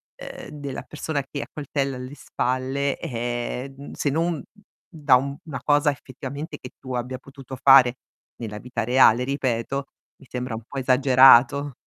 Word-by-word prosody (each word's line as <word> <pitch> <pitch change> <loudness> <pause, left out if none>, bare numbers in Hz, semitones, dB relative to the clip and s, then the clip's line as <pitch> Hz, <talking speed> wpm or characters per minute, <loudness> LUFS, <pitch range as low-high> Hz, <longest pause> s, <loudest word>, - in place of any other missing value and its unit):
ehm, - - -9
della 140 -3 -6
persona 150 -1 -3
che 140 - -4
accoltella 140 -2 -3
alle 130 +3 -8
spalle 135 +1 -2
è, 120 +2 -4
uhm, 140 +1 -10
se 145 - -1
non 165 +1 -1 0.5
da 150 -5 +4
una 140 +3 -3
cosa 145 0 +3
effettivamente 140 +3 -8
che 125 - -10
tu 130 -1 -7
abbia 125 +1 -3
potuto 135 0 -11
fare 135 -2 +7 0.4
nella 110 -3 -6
vita 120 0 -4
reale 125 0 +5
ripeto, 135 0 -2 0.3
mi - - -18
sembra 125 -2 -4
un 110 - -8
po' 140 - -8
esagerato. 135 +1 +5
135 Hz, 145 wpm, -24 LUFS, 125-140 Hz, 0.5 s, fare